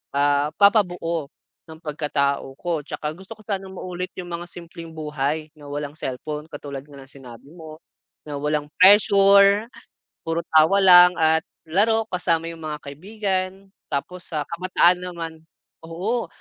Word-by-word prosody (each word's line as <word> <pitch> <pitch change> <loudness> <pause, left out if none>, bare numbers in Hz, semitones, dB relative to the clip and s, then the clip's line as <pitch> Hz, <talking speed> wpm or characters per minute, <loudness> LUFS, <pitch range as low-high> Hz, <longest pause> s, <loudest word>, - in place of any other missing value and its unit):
ah 145 0 +2
papabuo 180 -7 +2 0.4
ng 160 - -10
pagkatao 140 -3 -1
ko 170 -3 -2
tsaka 150 +1 -5
gusto 190 +5 -11
ko - - -17
sanang 195 -2 -4
maulit 180 0 -5
yung 180 - -5
mga 170 +1 -5
simpleng 170 -1 -10
buhay 150 0 -3
na 145 -2 -13
walang 145 0 -5
cellphone 150 +2 -6
katulad 140 -2 -7
nga 145 - -15
ng 135 0 -14
sinabi 125 -3 -13
mo, 160 -2 -11 0.5
na 145 -2 -6
walang 150 0 -1
pressure 200 +1 +6 0.6
puro 165 +1 -1
tawa 160 +6 +5
lang 180 -1 +8
at 160 -1 +3 0.3
laro 215 +7 +2
kasama 170 -2 0
yung 165 - -9
mga 155 -1 -4
kaibigan 185 +5 -3 0.4
tapos 180 +6 -5
sa 155 -3 -2
kabataan 180 0 +3
naman, 170 -2 -6 0.6
oo, 205 +9 -2
165 Hz, 145 wpm, -23 LUFS, 150-185 Hz, 0.6 s, lang